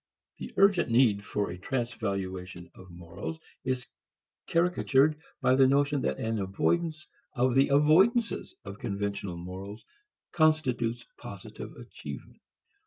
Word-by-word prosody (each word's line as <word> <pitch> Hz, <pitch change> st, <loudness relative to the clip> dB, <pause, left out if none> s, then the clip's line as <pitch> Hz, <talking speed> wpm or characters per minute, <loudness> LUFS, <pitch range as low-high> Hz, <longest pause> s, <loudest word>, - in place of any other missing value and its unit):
The -, -, -6 dB
urgent 195 Hz, -7 st, +4 dB
need 115 Hz, -4 st, +4 dB
for 105 Hz, -2 st, -2 dB
a 90 Hz, -, -8 dB
transvaluation 95 Hz, -7 st, -4 dB
of 95 Hz, 0 st, -14 dB
morals 85 Hz, -, -7 dB, 0.2 s
is 130 Hz, -1 st, -2 dB, 0.6 s
caricatured 155 Hz, -3 st, +3 dB, 0.2 s
by 130 Hz, -, +4 dB
the 130 Hz, 0 st, +6 dB
notion 140 Hz, +1 st, +2 dB
that 65 Hz, -, -1 dB
an 110 Hz, -1 st, -2 dB
avoidance 155 Hz, -, -1 dB, 0.3 s
of 125 Hz, 0 st, +2 dB
the 135 Hz, +2 st, +5 dB
avoidances 185 Hz, -, +3 dB
of 100 Hz, +2 st, -8 dB
conventional 100 Hz, -5 st, -3 dB
morals 95 Hz, +4 st, -8 dB, 0.5 s
constitutes 130 Hz, -8 st, +1 dB
positive -, -, -9 dB
achievement. -, -, -10 dB
125 Hz, 115 wpm, -29 LUFS, 100-150 Hz, 0.6 s, the